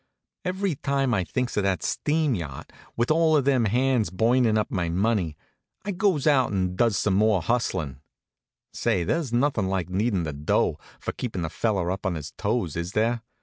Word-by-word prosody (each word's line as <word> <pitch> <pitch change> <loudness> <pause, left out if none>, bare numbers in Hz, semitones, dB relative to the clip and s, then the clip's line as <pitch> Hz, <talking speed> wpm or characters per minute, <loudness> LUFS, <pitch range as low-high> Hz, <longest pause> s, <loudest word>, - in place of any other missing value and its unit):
Every 190 -1 -1
time 135 -2 0
I 95 -4 +1
thinks 125 +9 -2
of - - +3
that 95 -4 0
steam 150 -2 +1
yacht, 75 - -6 0.2
with 120 +5 +1
all 160 -1 +4
them 135 -3 +2
hands 125 -1 +2
burnin' 115 +4 +2
up 105 - -1
my 85 -4 -1
money, 90 -3 0 0.5
I 205 - -1
goes 185 -6 +1
out 135 -5 +4
and 90 -2 -1
does 115 -2 +2
some 105 - +1
more 105 0 +3
hustlin'. 90 - -1 0.7
Say, 90 - 0
there's 150 - -1
nothin' 120 -5 +1
like 95 -3 -1
needin' 95 0 0
the 75 -2 -3
dough, 75 +1 0 0.2
for - - -3
keepin' 95 -9 -4
a 80 - -5
feller 95 -6 0
up 95 +1 -3
on 90 - -1
his 75 -1 -6
toes, 105 -6 -2
is 85 +2 -4
there? 115 +2 +1
110 Hz, 185 wpm, -25 LUFS, 90-130 Hz, 0.7 s, all